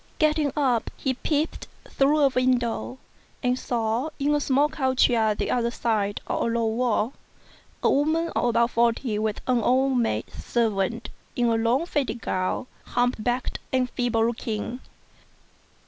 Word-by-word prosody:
Getting 305 -2 +2
up, 260 -6 +1
he 265 - -1
peeped 300 +4 -2 0.2
through 290 +3 +2
a 280 - +5
window, 255 -1 0 0.5
and 250 0 +1
saw, 235 +4 -1
in 290 +1 +1
a 295 - +2
small 280 +2 +3
court 260 -4 +2
yard 220 -3 +1
the - - -1
other 235 -1 +1
side 215 -4 -1
of - - -2
a - - +1
low 230 0 0
wall, 225 +1 0 0.7
a - - +4
woman 315 +4 +1
of - - -1
about 235 0 +2
forty 230 -1 +1
with 215 -1 -2
an 250 -2 +2
old 260 +2 +2
maid 110 - 0
servant 225 -1 -1 0.3
in 245 - +1
a 230 - +2
long 230 +7 +1
faded 285 -7 -2
gown, 185 +3 -2 0.2
humped 245 -2 0
backed 245 +2 -1
and 255 -1 +1
feeble 235 -2 +1
looking. 230 0 -3
245 Hz, 155 wpm, -25 LUFS, 225-265 Hz, 0.7 s, a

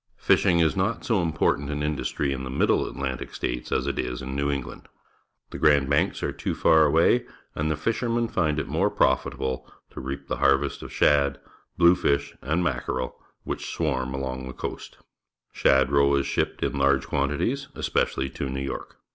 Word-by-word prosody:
Fishing 85 - +3
is 80 +1 +3
not 95 +5 -1
so 110 -6 +2
important 80 -3 0
an 75 0 -2
industry 75 -1 -1
in 65 0 -5
the 65 - -5
Middle 65 - +2
Atlantic 65 -2 -5
States - - -3
as - - +1
it - - -2
is 60 -1 -2
in 65 0 -5
New 70 +1 0
England. 70 -3 -5 0.6
The - - -6
Grand 70 -2 +4
Banks 70 - +1
are - - 0
too - - -3
far 80 -1 +5
away, 85 +11 +3 0.3
and 75 +1 -1
the 75 - 0
fishermen 115 +1 0
find 75 -8 0
it - - -3
more - - +1
profit 65 - +1
able 65 0 -4 0.2
to - - -8
reap 70 +1 -6
the - - -2
harvest 70 +1 +2
of - - -8
shad, 70 -1 +3 0.4
bluefish, 85 -5 +3
and 80 +6 0
mackerel 65 -4 -2 0.3
which - - -4
swarm 65 -5 -1
along 65 -1 -4
the 65 - -7
coast. - - -7 0.6
Shad^e^fe' 70 +1 +3
shipped 70 - -1
in 70 - -1
large 70 -1 +3
quantities, 75 - -1
especially 65 0 -1
to 70 - -4
New 65 +1 -3
York. 70 - -6
70 Hz, 175 wpm, -25 LUFS, 65-80 Hz, 0.6 s, far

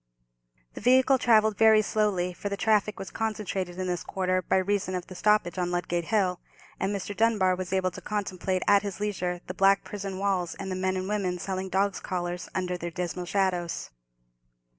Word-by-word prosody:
The - - -8
vehicle 260 +3 +5
travelled 220 -3 +4
very 220 -1 +6
slowly, 195 -4 0
for 205 - -5
the 200 - -3
traffic 210 -1 +2
was 195 - -7
concentrated 195 -5 -3
in 185 - -2
this 180 -2 -2
quarter 185 -1 0
by 180 - +1
reason 190 0 0
of 180 -1 -3
the - - -10
stoppage 190 -2 +2
on 175 -1 0
Ludgate 175 -1 -1
Hill, 185 -4 +1 0.4
and 195 - 0
Mr. 200 0 -4
Dunbar 210 -5 +3
was 180 0 -5
able 190 -1 +1
to - - -9
contemplate 190 -3 -2
at 200 -1 +6
his 200 -1 -5
leisure 180 -4 -2
the 185 - -5
black 195 +1 +4
prison 195 -2 -5
walls, 190 -3 -1
and 195 -1 -5
the - - -1
men 185 0 0
and 185 0 -3
women 195 -3 -1
selling 190 +1 -4
dogs' 195 +1 +1
collars 175 -1 -4
under 180 -1 -1
their 170 - -4
dismal 180 +1 -4
shadows. 180 -3 -1
190 Hz, 190 wpm, -27 LUFS, 180-205 Hz, 0.4 s, very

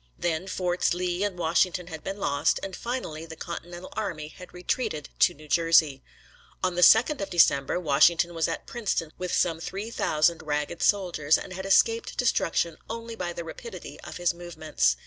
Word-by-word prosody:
Then 175 +2 -1
Forts 180 -2 0
Lee 180 +1 -1
and 200 -3 -2
Washington 175 +2 +1
had 160 -3 -8
been 195 +1 -4
lost, 145 -4 +1
and 195 -1 -5
finally 165 -11 -5
the 160 - -9
Continental 175 +2 -7
army 170 -8 -4
had 180 +3 -13
retreated 180 - -3
to - - +4
New 155 +1 -14
Jersey. 160 -3 +3 0.6
On 185 -1 +1
the 175 - -1
second 240 - +6
of 195 - -3
December 165 -4 +3
Washington 170 +2 +4
was 165 -1 0
at - - -4
Princeton 205 -9 -2
with 180 -1 -3
some 165 -2 +1
three 200 +6 -5
thousand 160 -4 +1
ragged 150 +1 -3
soldiers, 175 -7 +2
and 185 - -8
had 190 +1 -5
escaped 225 +3 +3
destruction 170 -8 +1
only 230 0 -5
by 180 -5 -3
the 170 0 -6
rapidity 445 - -9
of - - -8
his 175 -1 +1
movements. 160 - -1
175 Hz, 175 wpm, -27 LUFS, 160-190 Hz, 0.6 s, second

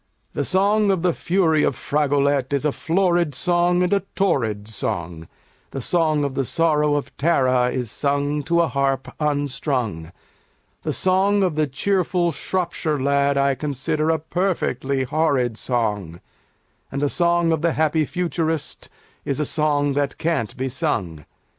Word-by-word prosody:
The - - -1
song 205 +3 +2
of 190 -3 +1
the 180 -2 +2
fury 165 -4 +1
of 140 - +1
Fragolette 140 -2 0
is 140 +1 0
a 150 - +2
florid 175 -2 +1
song 175 +2 +2
and 180 +2 +1
a 200 - +4 0.2
torrid 110 - 0
song, 85 -7 -4 0.4
The 135 - -5
song 155 +1 +1
of 140 -2 -2
the 135 - 0
sorrow 150 +1 +2
of 145 - -4
Tara 130 -5 +2
is 125 -3 -3
sung 145 +1 0
to 170 +3 +2
a 170 - +2
harp 135 -2 -1
unstrung, 135 - -2 0.7
The - - -2
song 195 +2 +2
of 180 -4 +1
the 155 -1 +1
cheerful 180 +4 0
Shropshire 165 -3 -2
Lad 140 +1 +2
I 140 0 +3
consider 150 +3 -2
a 160 - +3
perfectly 155 -6 -1
horrid 135 -4 +1
song, 105 -9 -2 0.7
And 140 - -3
the 145 - +1
song 170 +1 +2
of 160 -2 0
the 170 -1 +1
happy 155 0 +1
Futurist 165 -2 -3 0.3
is 140 - -2
a 150 - 0
song 145 -2 +1
that 140 0 -1
can't 160 -11 -2
be 130 +1 -2
sung. 115 - -3
150 Hz, 155 wpm, -22 LUFS, 135-170 Hz, 0.7 s, a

